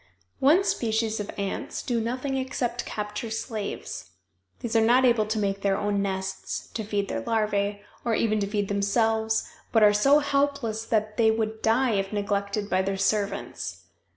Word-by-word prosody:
One 315 Hz, +8 st, +5 dB
species 225 Hz, -, 0 dB
of 210 Hz, -, -4 dB
ants 200 Hz, -1 st, -3 dB
do 235 Hz, -2 st, 0 dB
nothing 255 Hz, +4 st, -2 dB
except 250 Hz, -2 st, -2 dB
capture 210 Hz, +2 st, -4 dB
slaves. 215 Hz, -, -5 dB, 0.5 s
These 235 Hz, -1 st, -3 dB
are 225 Hz, -, +6 dB
not 245 Hz, +4 st, +5 dB
able 235 Hz, -4 st, +3 dB
to 220 Hz, +1 st, -1 dB
make 195 Hz, -1 st, -1 dB
their 195 Hz, -1 st, +2 dB
own 205 Hz, -1 st, 0 dB
nests, 190 Hz, -1 st, -3 dB
to 220 Hz, -, -3 dB
feed 205 Hz, -1 st, -1 dB
their 115 Hz, -, -3 dB
larvæ, 205 Hz, -, 0 dB, 0.2 s
or 230 Hz, -2 st, +1 dB
even 215 Hz, -1 st, +1 dB
to 200 Hz, -, 0 dB
feed 205 Hz, -1 st, -1 dB
themselves, 220 Hz, +2 st, +1 dB, 0.2 s
but 225 Hz, -2 st, +4 dB
are 205 Hz, 0 st, +7 dB
so 275 Hz, +8 st, +5 dB
helpless 280 Hz, -6 st, 0 dB
they 220 Hz, 0 st, +2 dB
would 220 Hz, 0 st, -1 dB
die 235 Hz, +3 st, +3 dB
if 195 Hz, -2 st, 0 dB
neglected 200 Hz, 0 st, -1 dB
by 185 Hz, -2 st, +2 dB
their 195 Hz, 0 st, -1 dB
servants. 200 Hz, +1 st, -2 dB
215 Hz, 165 wpm, -26 LUFS, 200-230 Hz, 0.5 s, are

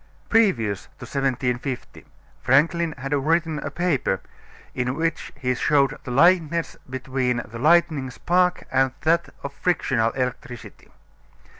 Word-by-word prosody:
Previous 125 Hz, -, +2 dB
to 130 Hz, -, -9 dB
1750 130 Hz, -1 st, -3 dB, 0.4 s
Franklin 165 Hz, +4 st, +2 dB
had 135 Hz, +2 st, -4 dB
written 160 Hz, +2 st, +1 dB
a -, -, -4 dB
paper 155 Hz, -, 0 dB, 0.5 s
in 125 Hz, 0 st, -2 dB
which 165 Hz, +1 st, -2 dB
he 125 Hz, -2 st, 0 dB
showed 140 Hz, +2 st, +2 dB
the -, -, -6 dB
likeness 170 Hz, +4 st, +3 dB
between 130 Hz, -2 st, -1 dB
the 115 Hz, +1 st, -9 dB
lightning 155 Hz, -2 st, +3 dB
spark 180 Hz, +7 st, +1 dB
and 130 Hz, -1 st, +2 dB
that 170 Hz, +2 st, +2 dB
of 140 Hz, -, -5 dB
frictional 130 Hz, -11 st, +1 dB
electricity. 125 Hz, -2 st, -5 dB
140 Hz, 120 wpm, -23 LUFS, 125-165 Hz, 0.5 s, likeness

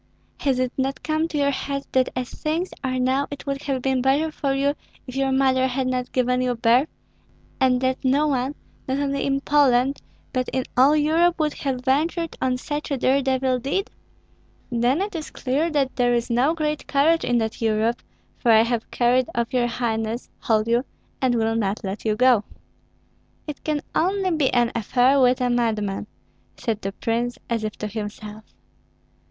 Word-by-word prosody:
Has 270 Hz, -3 st, +1 dB
it 255 Hz, -1 st, 0 dB
not 270 Hz, +1 st, -2 dB
come 315 Hz, +1 st, 0 dB
to 315 Hz, -, -4 dB
your 280 Hz, -1 st, +2 dB
head 275 Hz, 0 st, -3 dB
that 260 Hz, -1 st, +2 dB
as 250 Hz, -1 st, -3 dB
things 330 Hz, +4 st, -2 dB
are 255 Hz, -1 st, -1 dB
now 260 Hz, +2 st, +1 dB
it 285 Hz, -, -8 dB
would 275 Hz, -1 st, -3 dB
have 265 Hz, -3 st, -2 dB
been 265 Hz, -1 st, +1 dB
better 285 Hz, +5 st, +2 dB
for 280 Hz, -2 st, -2 dB
you 280 Hz, +1 st, +1 dB, 0.3 s
if 255 Hz, -, -9 dB
your 270 Hz, 0 st, +1 dB
mother 260 Hz, -1 st, +3 dB
had 260 Hz, +1 st, -1 dB
not 255 Hz, -1 st, -2 dB
given 250 Hz, 0 st, +1 dB
you 250 Hz, -1 st, 0 dB
birth, 235 Hz, +5 st, +3 dB, 0.7 s
and 255 Hz, -2 st, +3 dB
that 260 Hz, +1 st, -1 dB
no 275 Hz, +3 st, +3 dB
one, 270 Hz, -1 st, -1 dB, 0.3 s
not 265 Hz, +1 st, 0 dB
only 280 Hz, -1 st, -1 dB
in 275 Hz, 0 st, 0 dB
Poland, 275 Hz, -2 st, +3 dB, 0.3 s
but 255 Hz, -2 st, -1 dB
in 260 Hz, -, -1 dB
all 270 Hz, +4 st, +5 dB
Europe, 325 Hz, +3 st, +3 dB
would 305 Hz, -2 st, 0 dB
have 260 Hz, -2 st, -3 dB
ventured 325 Hz, +5 st, 0 dB
on 255 Hz, -1 st, +1 dB
such 295 Hz, +3 st, -4 dB
a 280 Hz, -, -1 dB
dare 265 Hz, +2 st, +2 dB
devil 260 Hz, -1 st, +1 dB
deed?" 280 Hz, -, -2 dB, 0.8 s
"Then 245 Hz, +7 st, +1 dB
it 410 Hz, 0 st, -5 dB
is 320 Hz, -3 st, -5 dB
clear 280 Hz, +6 st, -1 dB
that 280 Hz, -4 st, 0 dB
there 245 Hz, -1 st, +2 dB
is 235 Hz, 0 st, -1 dB
no 260 Hz, +7 st, +2 dB
great 300 Hz, -2 st, -2 dB
courage 310 Hz, +4 st, +3 dB
in 245 Hz, -, +1 dB
that 225 Hz, 0 st, -2 dB
Europe, 225 Hz, +1 st, +1 dB, 0.4 s
for 240 Hz, -, 0 dB
I 220 Hz, 0 st, +7 dB
have 230 Hz, -1 st, -2 dB
carried 250 Hz, +1 st, +2 dB
off 235 Hz, +2 st, -1 dB
your 245 Hz, -1 st, +2 dB
highness, 230 Hz, -1 st, -2 dB
hold 220 Hz, -1 st, +1 dB
you, 235 Hz, +2 st, +2 dB, 0.4 s
and 255 Hz, -2 st, +2 dB
will 225 Hz, -1 st, +1 dB
not 210 Hz, -2 st, -1 dB
let 195 Hz, +3 st, -5 dB
you 215 Hz, -1 st, +2 dB
go." 245 Hz, -2 st, +4 dB, 1.0 s
"It 300 Hz, -2 st, -7 dB
can 300 Hz, -2 st, -1 dB
only 375 Hz, +2 st, +1 dB
be 305 Hz, -5 st, +2 dB
an 240 Hz, -1 st, +2 dB
affair 250 Hz, +5 st, +3 dB
with 250 Hz, 0 st, +4 dB
a 250 Hz, -1 st, +1 dB
madman," 215 Hz, -4 st, -1 dB, 0.5 s
said 220 Hz, -3 st, -2 dB
the 195 Hz, -, -3 dB
prince, 235 Hz, +3 st, -2 dB
as 230 Hz, -2 st, 0 dB
if 215 Hz, -1 st, -4 dB
to -, -, -4 dB
himself. 210 Hz, 0 st, -6 dB
260 Hz, 190 wpm, -23 LUFS, 240-280 Hz, 1.0 s, I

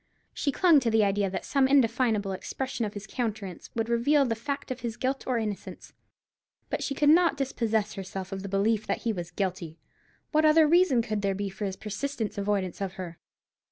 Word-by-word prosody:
She 285 Hz, -, -1 dB
clung 335 Hz, +1 st, +5 dB
to 240 Hz, -3 st, 0 dB
the 220 Hz, -1 st, +4 dB
idea 200 Hz, 0 st, +1 dB
that 190 Hz, -, -4 dB
some 275 Hz, -1 st, +3 dB
indefinable 230 Hz, -6 st, +2 dB
expression 250 Hz, +5 st, -3 dB
of 210 Hz, -, -6 dB
his 205 Hz, 0 st, -6 dB
countenance 210 Hz, -6 st, -4 dB
would 225 Hz, -1 st, -1 dB
reveal 270 Hz, +5 st, +3 dB
the 235 Hz, -, 0 dB
fact 270 Hz, +5 st, -4 dB
of 255 Hz, -, -4 dB
his 235 Hz, -2 st, -4 dB
guilt 265 Hz, +1 st, -2 dB
or 255 Hz, -2 st, +1 dB
innocence. 210 Hz, -3 st, -5 dB, 0.8 s
But -, -, -1 dB
she 275 Hz, -, -2 dB
could 290 Hz, -, +2 dB
not 335 Hz, 0 st, +5 dB
dispossess 225 Hz, -6 st, -1 dB
herself 190 Hz, -1 st, -6 dB
of 195 Hz, 0 st, -4 dB
the 200 Hz, -, -6 dB
belief 210 Hz, +2 st, +1 dB
that -, -, -2 dB
he 230 Hz, -2 st, 0 dB
was 175 Hz, -3 st, -5 dB
guilty. 180 Hz, -3 st, -3 dB, 0.5 s
What 310 Hz, 0 st, +3 dB
other 310 Hz, 0 st, +6 dB
reason 330 Hz, -7 st, +4 dB
could 215 Hz, -3 st, -2 dB
there 195 Hz, -1 st, 0 dB
be 200 Hz, 0 st, -3 dB
for 195 Hz, +2 st, -5 dB
his 190 Hz, -1 st, -3 dB
persistent 220 Hz, +3 st, -4 dB
avoidance 200 Hz, -2 st, -1 dB
of 190 Hz, -1 st, -2 dB
her? 180 Hz, -3 st, -8 dB
220 Hz, 200 wpm, -28 LUFS, 195-265 Hz, 0.8 s, other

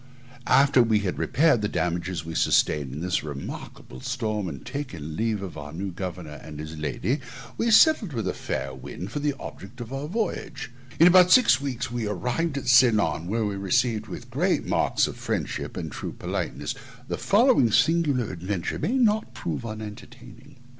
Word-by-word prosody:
After 135 Hz, -2 st, +5 dB
we 110 Hz, -3 st, +3 dB
had 95 Hz, -3 st, -3 dB
repaired 150 Hz, -6 st, +3 dB
the 105 Hz, -, 0 dB
damages 90 Hz, -1 st, -2 dB
we 80 Hz, -, -6 dB
sustained 70 Hz, -4 st, +2 dB
in 75 Hz, +4 st, -6 dB
this 90 Hz, 0 st, 0 dB
remarkable 70 Hz, -3 st, -8 dB
storm, 110 Hz, -6 st, -2 dB
and 70 Hz, -5 st, -9 dB
taken 85 Hz, -, -5 dB
leave 110 Hz, -1 st, -1 dB
of 95 Hz, -, -6 dB
the 75 Hz, 0 st, -8 dB
new 95 Hz, +3 st, -4 dB
governor 90 Hz, -4 st, -6 dB
and 75 Hz, -2 st, -9 dB
his 80 Hz, +1 st, -6 dB
lady, 75 Hz, -, -2 dB, 0.4 s
we 230 Hz, -, 0 dB
sailed 230 Hz, -, +5 dB
with 115 Hz, -7 st, -3 dB
a 90 Hz, -, 0 dB
fair 65 Hz, 0 st, -4 dB
wind 90 Hz, +8 st, -8 dB
for -, -, -3 dB
the 145 Hz, -1 st, 0 dB
object 100 Hz, +7 st, -9 dB
of 120 Hz, +1 st, -7 dB
our 135 Hz, +2 st, -4 dB
voyage. 150 Hz, -, -3 dB, 0.3 s
In 165 Hz, -, +8 dB
about 180 Hz, 0 st, +7 dB
six 245 Hz, -, +6 dB
weeks 130 Hz, -4 st, -3 dB
we 120 Hz, -3 st, -2 dB
arrived 125 Hz, -, -1 dB
at 135 Hz, -, -5 dB
Ceylon, 115 Hz, -8 st, +4 dB
where 110 Hz, +3 st, 0 dB
we 100 Hz, -1 st, -2 dB
were 100 Hz, -, -6 dB
received 115 Hz, 0 st, +1 dB
with 95 Hz, -, -9 dB
great -, -, +1 dB
marks -, -, +2 dB
of -, -, -6 dB
friendship -, -, -3 dB
and -, -, -4 dB
true -, -, -6 dB
politeness. -, -, -3 dB, 0.3 s
The -, -, -3 dB
following 220 Hz, -, +4 dB
singular 150 Hz, -4 st, +2 dB
adventures 90 Hz, 0 st, -3 dB
may 250 Hz, +5 st, +1 dB
not 220 Hz, -3 st, +2 dB
prove 85 Hz, +5 st, -4 dB
unentertaining. 115 Hz, +5 st, -9 dB
110 Hz, 180 wpm, -25 LUFS, 90-140 Hz, 0.4 s, In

